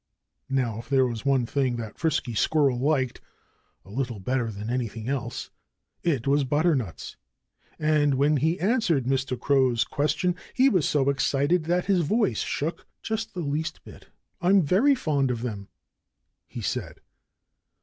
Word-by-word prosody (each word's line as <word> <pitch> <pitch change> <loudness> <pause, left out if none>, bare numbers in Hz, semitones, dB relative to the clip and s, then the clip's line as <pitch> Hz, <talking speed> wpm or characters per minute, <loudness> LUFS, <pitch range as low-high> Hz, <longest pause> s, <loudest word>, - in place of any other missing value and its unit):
Now, 125 -5 0
if 115 - -11
there 135 -2 +4
was 120 -1 -4
one 135 -3 +3
thing 130 0 0
that 110 -3 -7
Frisky 155 -7 0
Squirrel 135 +2 +2
liked 135 -2 0 0.6
a 95 - -14
little 120 -2 -3
better 125 +4 -1
than 105 0 -6
anything 115 -2 -3
else, 130 -3 -3 0.5
it 145 -9 0
was 140 +1 +3
butternuts. 145 - -1 0.6
And 150 -2 +2
when 145 +3 +3
he 160 +7 +1
answered 190 - +1
Mr. 130 -1 -1
Crow's 130 -4 +3
question 175 +5 0 0.2
he 265 +1 +5
was 185 - +2
so 140 -2 +2
excited 145 +4 +1
that 175 +2 +1
his 190 -1 +2
voice 170 - +1
shook 160 +4 -3 0.2
just 220 -2 -3
the 180 - -3
least 155 +1 -3
bit. - - -14 0.3
"I'm 190 +2 +4
very 220 - +4
fond 145 - 0
of 120 -2 -2
them," 105 -5 -5 0.8
he - - -7
said. - - -3
140 Hz, 150 wpm, -26 LUFS, 125-160 Hz, 0.8 s, he